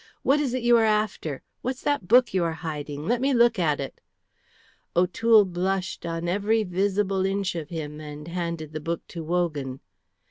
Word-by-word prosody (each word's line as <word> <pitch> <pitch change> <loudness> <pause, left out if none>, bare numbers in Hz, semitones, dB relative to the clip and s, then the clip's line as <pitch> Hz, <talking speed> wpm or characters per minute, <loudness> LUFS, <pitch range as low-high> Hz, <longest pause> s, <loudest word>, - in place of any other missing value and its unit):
What 280 +2 +4
is 265 -4 0
it 255 - -2
you 240 0 +6
are 225 - +4
after? 210 -9 0 0.2
What's 255 +1 -4
that 285 -11 0
book 245 +2 +5
you 185 -2 +2
are 165 -1 0
hiding? 150 -1 -4
Let 240 +2 +1
me 270 0 +2
look 235 -3 +4
at 155 -4 +1
it!" 135 - -6 0.9
O'Toole 205 +5 +5
blushed 185 0 -2
on 165 +1 -3
every 205 +5 +1
visible 195 +1 0
inch 195 0 0
of 160 -3 -5
him 155 -3 -5
and 150 0 -8
handed 170 -3 -4
the 155 - -3
book 165 +2 -4
to 170 -2 -6
Wogan. 155 -6 -1
180 Hz, 180 wpm, -25 LUFS, 160-220 Hz, 0.9 s, you